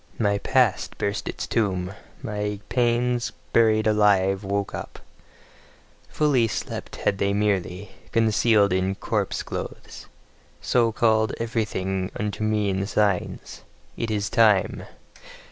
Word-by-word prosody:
My 100 Hz, -2 st, +1 dB
past -, -, +1 dB
burst 100 Hz, 0 st, -2 dB
its -, -, -4 dB
tomb, 95 Hz, -5 st, -1 dB, 0.3 s
many 105 Hz, -1 st, -3 dB
pains 120 Hz, 0 st, +1 dB, 0.2 s
buried 110 Hz, -1 st, +4 dB
alive 100 Hz, -2 st, +3 dB
woke 100 Hz, 0 st, -2 dB
up: -, -, -7 dB, 1.1 s
fully 140 Hz, -6 st, +2 dB
slept 105 Hz, -, -5 dB
had 100 Hz, -, -1 dB
they 100 Hz, 0 st, +1 dB
merely, 100 Hz, -2 st, -1 dB, 0.2 s
concealed 110 Hz, -3 st, +3 dB
in 95 Hz, +1 st, 0 dB
corpse -, -, -2 dB
clothes. -, -, -7 dB, 0.5 s
So 120 Hz, -2 st, +2 dB
called 110 Hz, -1 st, +2 dB
everything 95 Hz, -5 st, -2 dB
unto 105 Hz, 0 st, -3 dB
me 110 Hz, -1 st, +1 dB
in 95 Hz, +1 st, -1 dB
signs: 100 Hz, -4 st, -1 dB, 0.3 s
"It 115 Hz, -, -3 dB
is 105 Hz, -2 st, -1 dB
time!" 110 Hz, -5 st, +3 dB
105 Hz, 115 wpm, -24 LUFS, 100-115 Hz, 1.1 s, buried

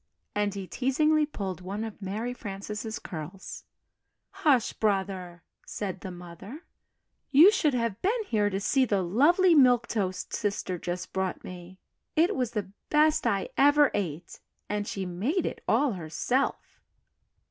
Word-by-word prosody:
and 205 Hz, -1 st, 0 dB
he 195 Hz, -1 st, -5 dB
teasingly 300 Hz, -, +2 dB
pulled 190 Hz, -, -5 dB
one 200 Hz, +4 st, -4 dB
of 220 Hz, -2 st, -7 dB
Mary 215 Hz, +6 st, -3 dB
Frances' 210 Hz, 0 st, -5 dB
curls. 170 Hz, +2 st, -8 dB, 0.7 s
"Hush, 270 Hz, -7 st, +2 dB
Brother!" 190 Hz, -4 st, -2 dB, 0.2 s
said 190 Hz, -3 st, -4 dB
the 190 Hz, -, -6 dB
mother, 180 Hz, -, -10 dB, 0.6 s
"you 310 Hz, +8 st, +8 dB
should 300 Hz, -10 st, +1 dB
have 230 Hz, -4 st, -1 dB
been 445 Hz, +4 st, +1 dB
here 210 Hz, -, +1 dB
to 195 Hz, -1 st, -2 dB
see 265 Hz, +6 st, +2 dB
the 205 Hz, -6 st, +1 dB
lovely 330 Hz, -, +4 dB
Milk 250 Hz, -5 st, +5 dB
Toast 190 Hz, -6 st, -3 dB
Sister 200 Hz, -4 st, -2 dB
just 180 Hz, +2 st, -5 dB
brought 190 Hz, -1 st, -2 dB
me. 180 Hz, 0 st, -10 dB, 0.4 s
It 340 Hz, +6 st, +3 dB
was 250 Hz, -3 st, -1 dB
the 200 Hz, -4 st, -3 dB, 0.2 s
best 305 Hz, -3 st, +3 dB
I 200 Hz, -4 st, 0 dB
ever 290 Hz, 0 st, +5 dB
ate 170 Hz, -4 st, -4 dB, 0.3 s
and 210 Hz, 0 st, -2 dB
she 195 Hz, -1 st, -3 dB
made 230 Hz, -, -1 dB
it -, -, -4 dB
all 255 Hz, +4 st, +3 dB
herself." 190 Hz, -, -2 dB
210 Hz, 145 wpm, -28 LUFS, 190-270 Hz, 0.7 s, you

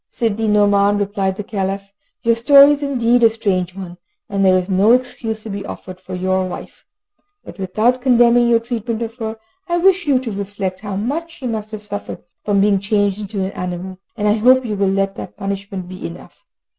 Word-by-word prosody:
"Sidi 225 Hz, -2 st, -1 dB
Nouman," 205 Hz, -1 st, +3 dB
replied 195 Hz, -1 st, -1 dB
the 210 Hz, -, -5 dB
Caliph, 195 Hz, -1 st, -4 dB, 0.3 s
"your 230 Hz, -, +4 dB
story 275 Hz, +5 st, +7 dB
is 290 Hz, 0 st, 0 dB
indeed 245 Hz, -4 st, +2 dB
a 230 Hz, -, +7 dB
strange 190 Hz, -5 st, -1 dB
one, 180 Hz, -3 st, -8 dB, 0.3 s
and 200 Hz, -1 st, 0 dB
there 185 Hz, -1 st, +5 dB
is 180 Hz, -1 st, -2 dB
no 200 Hz, +4 st, +4 dB
excuse 230 Hz, -3 st, -1 dB
to 225 Hz, -, -7 dB
be 200 Hz, 0 st, -5 dB
offered 185 Hz, -2 st, -9 dB
for 185 Hz, 0 st, -7 dB
your 185 Hz, 0 st, 0 dB
wife. -, -, -9 dB, 0.6 s
But, -, -, -12 dB
without 215 Hz, +7 st, +1 dB
condemning 240 Hz, -1 st, +4 dB
your 230 Hz, -1 st, +4 dB
treatment 230 Hz, -1 st, -3 dB
of 225 Hz, 0 st, -6 dB
her, 220 Hz, -2 st, -4 dB, 0.3 s
I 345 Hz, -, +1 dB
wish 380 Hz, -1 st, +3 dB
you 275 Hz, -3 st, +4 dB
to 250 Hz, -3 st, -3 dB
reflect 195 Hz, -2 st, -4 dB
how 205 Hz, -1 st, -5 dB
much 300 Hz, -, -3 dB
she 265 Hz, -, -9 dB
must 220 Hz, -3 st, -3 dB
suffer 210 Hz, 0 st, -6 dB, 0.3 s
from 200 Hz, -1 st, +2 dB
being 200 Hz, -1 st, +3 dB
changed 205 Hz, 0 st, 0 dB
into 200 Hz, -1 st, -3 dB
an 190 Hz, -, -4 dB
animal, 180 Hz, +1 st, -5 dB, 0.2 s
and 210 Hz, -1 st, 0 dB
I 210 Hz, -, +4 dB
hope 250 Hz, +4 st, +4 dB
you 215 Hz, -2 st, -2 dB
will 200 Hz, 0 st, +1 dB
let 195 Hz, 0 st, 0 dB
that -, -, -8 dB
punishment 195 Hz, -2 st, -5 dB
be 185 Hz, 0 st, -9 dB
enough. 170 Hz, -, -13 dB
205 Hz, 200 wpm, -19 LUFS, 195-235 Hz, 0.6 s, story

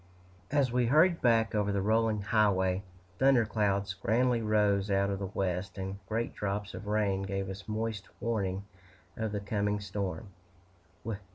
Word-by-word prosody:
As 140 Hz, -4 st, +2 dB
we 125 Hz, -1 st, +2 dB
hurried 165 Hz, +6 st, +4 dB
back 115 Hz, -2 st, +3 dB
over 105 Hz, -1 st, +1 dB
the 100 Hz, -, 0 dB
rolling 110 Hz, +1 st, +2 dB
highway, 100 Hz, -4 st, +2 dB, 0.4 s
thunder 130 Hz, -3 st, +5 dB
clouds 100 Hz, -2 st, 0 dB
grandly 115 Hz, +5 st, +1 dB
rose 105 Hz, -2 st, +2 dB
out 100 Hz, 0 st, +2 dB
of 100 Hz, -, -2 dB
the 100 Hz, -, -3 dB
west, 95 Hz, 0 st, -2 dB
and 95 Hz, +1 st, -4 dB
great 115 Hz, +3 st, -2 dB
drops 100 Hz, 0 st, -3 dB
of 105 Hz, -, -8 dB
rain 105 Hz, -2 st, +1 dB
gave 95 Hz, 0 st, -3 dB
us 95 Hz, +2 st, -9 dB
moist 110 Hz, -2 st, -3 dB
warning 100 Hz, -4 st, -1 dB, 0.5 s
of 110 Hz, -1 st, -2 dB
the 105 Hz, -, -2 dB
coming 105 Hz, 0 st, -1 dB
storm. 100 Hz, +1 st, -4 dB
105 Hz, 155 wpm, -30 LUFS, 100-115 Hz, 0.5 s, thunder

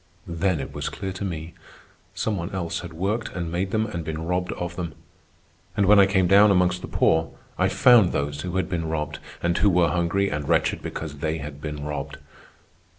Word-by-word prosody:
Then 85 Hz, 0 st, 0 dB
it -, -, -6 dB
was -, -, -3 dB
clear 95 Hz, -, -5 dB
to 95 Hz, +2 st, -6 dB
me, 85 Hz, -3 st, -5 dB, 0.6 s
some 110 Hz, -, -1 dB
one 85 Hz, -2 st, -4 dB
else 85 Hz, -2 st, -2 dB
had 90 Hz, -2 st, -8 dB
worked 100 Hz, +8 st, -2 dB
and 85 Hz, -2 st, -3 dB
made 90 Hz, +3 st, -1 dB
them 110 Hz, +2 st, +1 dB
and 85 Hz, -7 st, -5 dB
been 80 Hz, +1 st, -4 dB
robbed 90 Hz, +1 st, -1 dB
of 90 Hz, 0 st, -5 dB
them. 85 Hz, -5 st, -5 dB, 0.8 s
And 100 Hz, -, +3 dB
when 100 Hz, +1 st, +7 dB
I 100 Hz, -, +7 dB
came 95 Hz, -2 st, +2 dB
down 100 Hz, +3 st, +6 dB
amongst 90 Hz, -1 st, +2 dB
the -, -, -6 dB
poor 80 Hz, 0 st, +2 dB, 0.3 s
I -, -, +2 dB
found 120 Hz, -7 st, +6 dB
those 75 Hz, +1 st, -2 dB
who 90 Hz, 0 st, -4 dB
had 95 Hz, -, 0 dB
been 85 Hz, -4 st, -2 dB
robbed 75 Hz, -1 st, -3 dB, 0.2 s
and 85 Hz, 0 st, +1 dB
who 105 Hz, -, +5 dB
were 85 Hz, -2 st, +3 dB
hungry 90 Hz, +3 st, +1 dB
and 75 Hz, -1 st, -4 dB
wretched -, -, +2 dB
because 75 Hz, -3 st, -6 dB
they 80 Hz, +2 st, -1 dB
had 75 Hz, -1 st, -8 dB
been 75 Hz, -1 st, -5 dB
robbed." 75 Hz, -2 st, -5 dB
85 Hz, 210 wpm, -24 LUFS, 80-95 Hz, 0.8 s, when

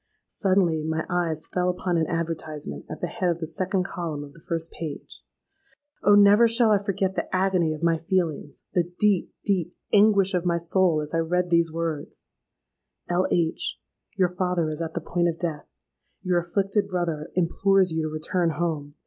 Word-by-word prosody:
Suddenly 185 Hz, -5 st, +1 dB
my 160 Hz, 0 st, -2 dB
eyes 165 Hz, -3 st, 0 dB
fell 180 Hz, 0 st, 0 dB
upon 180 Hz, 0 st, -1 dB
an 160 Hz, -2 st, +1 dB
advertisement 160 Hz, -3 st, -4 dB
at 155 Hz, -, -7 dB
the -, -, 0 dB
head 180 Hz, +1 st, -1 dB
of 170 Hz, -1 st, -1 dB
the 165 Hz, -, -3 dB
second 185 Hz, +4 st, -1 dB
column 160 Hz, -5 st, -4 dB
of 140 Hz, -1 st, -12 dB
the 165 Hz, -, -16 dB
first 165 Hz, 0 st, -3 dB
page. 155 Hz, -4 st, -8 dB, 0.8 s
Oh! 205 Hz, -, +5 dB
never 205 Hz, +3 st, +7 dB
shall 230 Hz, -1 st, +3 dB
I 205 Hz, -2 st, +3 dB
forget 195 Hz, -1 st, -1 dB
the -, -, -2 dB
agony 185 Hz, -4 st, +1 dB
of 155 Hz, -, -10 dB
my 165 Hz, -1 st, +2 dB
feelings—the 175 Hz, 0 st, -2 dB
deep, 205 Hz, -4 st, +2 dB
deep 180 Hz, -4 st, 0 dB, 0.2 s
anguish 200 Hz, -2 st, +5 dB
of 180 Hz, -2 st, +1 dB
my 170 Hz, -1 st, +1 dB
soul, 170 Hz, -1 st, +2 dB
as 150 Hz, -, -7 dB
I 165 Hz, -, +2 dB
read 175 Hz, +2 st, 0 dB
these 170 Hz, -1 st, +3 dB
words:—'_L. 165 Hz, +2 st, -5 dB
H., 165 Hz, -2 st, 0 dB, 0.4 s
your 185 Hz, -2 st, +3 dB
father 180 Hz, -2 st, -1 dB
is 155 Hz, +2 st, -5 dB
at 165 Hz, -1 st, -4 dB
the 170 Hz, -, -2 dB
point 175 Hz, +2 st, 0 dB
of 165 Hz, -1 st, -1 dB
death. 165 Hz, -3 st, -4 dB, 0.6 s
Your 180 Hz, -1 st, +2 dB
afflicted 195 Hz, +4 st, 0 dB
brother 170 Hz, -5 st, -2 dB
implores 185 Hz, +1 st, +2 dB
you 160 Hz, 0 st, -1 dB
to 155 Hz, -, -2 dB
return 165 Hz, +3 st, 0 dB
home. 150 Hz, -4 st, -2 dB
175 Hz, 175 wpm, -25 LUFS, 160-185 Hz, 0.8 s, never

